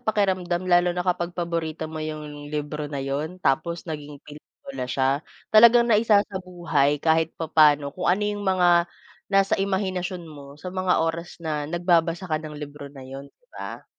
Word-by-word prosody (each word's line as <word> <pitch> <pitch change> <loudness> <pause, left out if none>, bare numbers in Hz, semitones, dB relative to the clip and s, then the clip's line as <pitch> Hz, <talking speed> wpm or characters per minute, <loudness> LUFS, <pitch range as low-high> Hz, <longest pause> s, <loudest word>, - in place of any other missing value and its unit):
pakiramdam 185 -5 0
lalo 175 -1 +3
na 180 - -1
kapag 175 -1 -1
paborito 165 -2 -3
mo 160 0 -6
'yong 150 -1 -6
libro 150 0 -4
na 145 -1 -5
'yon, 145 +6 -3
tapos 170 +5 0
naging 150 -3 -7
pelikula 140 -3 -9
siya. 135 +3 +1 0.3
Talagang 235 +2 +8
naisasabuhay 185 -9 +2
kahit 160 0 +2
papaano 150 -3 +3
kung 180 - -2
ano 190 +4 +2
'yong 205 0 -2
mga 185 -2 +3 0.6
nasa 195 0 +3
imahinasyon 190 -2 -2
mo 145 -3 -12
sa 180 +4 -8
mga 185 -3 +1
oras 165 +1 -4
na 150 -2 -2
nagbabasa 170 +1 +1
ka 155 -4 -1
ng 155 -1 -8
libro 145 -1 -8
na 135 -2 -12
'yon, 135 +2 -9
'di - - -37
ba? - - -8
165 Hz, 160 wpm, -24 LUFS, 150-185 Hz, 0.6 s, Talagang